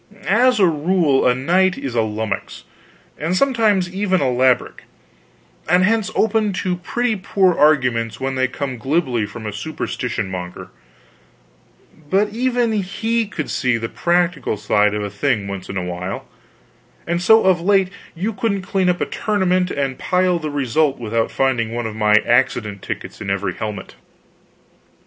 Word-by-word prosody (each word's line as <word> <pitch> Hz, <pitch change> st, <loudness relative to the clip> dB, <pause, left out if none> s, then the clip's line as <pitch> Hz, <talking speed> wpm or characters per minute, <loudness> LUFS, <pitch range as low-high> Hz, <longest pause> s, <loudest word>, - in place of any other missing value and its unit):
As 245 Hz, +4 st, +3 dB
a 195 Hz, -, +6 dB
rule, 160 Hz, -3 st, +2 dB
a 125 Hz, -, +3 dB
knight 180 Hz, +8 st, +2 dB
is 135 Hz, -3 st, -5 dB
a 120 Hz, -, +1 dB
lummux, 110 Hz, -2 st, -3 dB, 0.6 s
and 165 Hz, +4 st, 0 dB
some 275 Hz, +3 st, +2 dB
times 210 Hz, -6 st, +2 dB
even 190 Hz, -1 st, +1 dB
a -, -, 0 dB
labrick, 125 Hz, 0 st, +1 dB, 0.8 s
and 180 Hz, +2 st, +4 dB
hence 220 Hz, +1 st, +2 dB
open 215 Hz, -1 st, +1 dB
to 180 Hz, -1 st, -2 dB
pretty 240 Hz, +5 st, -1 dB
poor 190 Hz, -1 st, +2 dB
arguments 125 Hz, -7 st, +2 dB
when 135 Hz, 0 st, -2 dB
they 130 Hz, 0 st, +1 dB
come 130 Hz, -2 st, -5 dB
glibly 130 Hz, -4 st, 0 dB
from 110 Hz, +2 st, -9 dB
a 105 Hz, -, -4 dB
superstition 125 Hz, -4 st, -4 dB
monger, 90 Hz, -1 st, -7 dB, 1.4 s
but 200 Hz, +4 st, +2 dB
even 245 Hz, 0 st, 0 dB
he 220 Hz, +3 st, -1 dB
could 155 Hz, -7 st, -5 dB
see 125 Hz, -3 st, +1 dB
the 115 Hz, 0 st, -4 dB
practical 175 Hz, -8 st, 0 dB
side 105 Hz, 0 st, +2 dB
of 105 Hz, -, -2 dB
a 100 Hz, -, -3 dB
thing 100 Hz, 0 st, -1 dB
once 100 Hz, -2 st, -6 dB
in 95 Hz, -, -4 dB
a 90 Hz, -, -2 dB
while; 90 Hz, +1 st, -5 dB, 0.8 s
and 175 Hz, +1 st, -1 dB
so 220 Hz, +5 st, +6 dB
of 185 Hz, -2 st, +3 dB
late 195 Hz, 0 st, +3 dB, 0.3 s
you 200 Hz, +7 st, -2 dB
couldn't 200 Hz, -1 st, -1 dB
clean 190 Hz, -1 st, 0 dB
up 180 Hz, -, 0 dB
a -, -, +2 dB
tournament 185 Hz, -3 st, 0 dB
and 135 Hz, -4 st, -2 dB
pile 180 Hz, -1 st, +1 dB
the 155 Hz, -2 st, -4 dB
result 145 Hz, +1 st, +1 dB
without 115 Hz, -1 st, -1 dB
finding 120 Hz, -4 st, 0 dB
one 120 Hz, -1 st, -2 dB
of 110 Hz, -1 st, -5 dB
my 105 Hz, -1 st, +2 dB
accident 110 Hz, -5 st, +1 dB
tickets -, -, -7 dB
in -, -, -4 dB
every 95 Hz, -1 st, -1 dB
helmet. 105 Hz, -2 st, -6 dB
155 Hz, 165 wpm, -20 LUFS, 115-190 Hz, 1.4 s, a